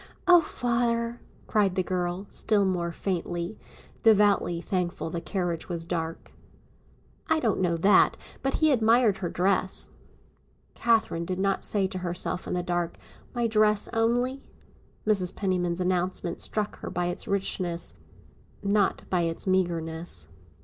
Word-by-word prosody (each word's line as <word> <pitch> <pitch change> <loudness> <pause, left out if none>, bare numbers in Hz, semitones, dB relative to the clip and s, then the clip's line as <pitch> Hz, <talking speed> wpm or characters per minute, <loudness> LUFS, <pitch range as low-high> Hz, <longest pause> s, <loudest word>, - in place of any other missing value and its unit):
"Oh, 355 -1 +8
father," 235 -3 -1 0.2
cried 200 -4 +2
the 185 - +1
girl, 180 +1 -2
still 210 -2 +2
more 175 -2 0
faintly, 175 +1 -3 0.4
devoutly 205 -5 +4
thankful 180 -2 -2
the 170 - -3
carriage 175 0 -2
was 170 -2 -4
dark. 165 -1 -4 1.0
"I 315 - +3
don't 225 -8 +1
know 170 -2 +1
that; 195 +5 +5 0.2
but 270 0 0
he 315 -1 +4
admired 225 -3 +4
her 175 -3 -2
dress." 185 +1 +1 0.8
Catherine 225 -7 +1
did 180 +2 -3
not 195 0 0
say 200 -2 +1
to 185 0 -3
herself 180 0 -2
in - - -2
the 180 - -1
dark, 175 -1 -2 0.4
"My 240 -1 +1
dress 215 -2 +3
only?" 245 +4 +1 0.6
Mrs. 195 -4 +1
Penniman's 180 -3 0
announcement 180 -1 -1
struck 210 -1 -3
her - - -6
by 175 0 -1
its 175 +2 -3
richness, 185 -3 -1 0.7
not 200 0 +2
by 180 -2 +1
its 165 -1 -2
meagreness. 165 - -1
185 Hz, 135 wpm, -27 LUFS, 175-215 Hz, 1.0 s, Oh